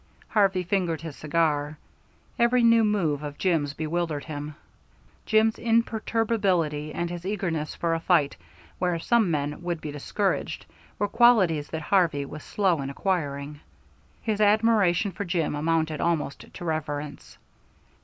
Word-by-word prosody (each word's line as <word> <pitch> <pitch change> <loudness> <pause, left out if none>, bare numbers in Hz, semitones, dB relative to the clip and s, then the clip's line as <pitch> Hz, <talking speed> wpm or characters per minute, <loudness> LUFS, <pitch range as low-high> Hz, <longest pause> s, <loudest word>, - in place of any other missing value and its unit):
Harvey 195 -3 +2
fingered 175 -4 -1
his 160 -4 -7
cigar. 150 -1 0 0.6
Every 240 +1 +4
new 230 -1 +6
move 175 -9 +1
of 145 -1 -6
Jim's 155 -6 0
bewildered 160 -1 -2
him. 150 -1 -6 0.7
Jim's 220 0 +3
imperturbability, 215 -9 0
and 175 - -2
his 175 -1 -6
eagerness 180 -6 -2
for 170 -1 0
a 165 - 0
fight 165 -4 +2 0.4
where 180 -2 +1
some 220 +3 +2
men 150 -1 -2
would 175 -2 -3
be 150 - -6
discouraged, 190 +7 -2 0.3
were 205 - 0
qualities 200 -10 +4
that 160 -1 -4
Harvey 160 -6 +2
was 155 +2 -9
slow 185 -7 +1
in 135 - -4
acquiring. 145 -3 -2 0.6
His 215 -2 -1
admiration 210 -3 +3
for 190 +3 -5
Jim 170 -4 -1
amounted 155 0 0
almost 160 -5 -2
to 175 - -8
reverence. 150 -3 -4
170 Hz, 135 wpm, -26 LUFS, 150-200 Hz, 0.7 s, new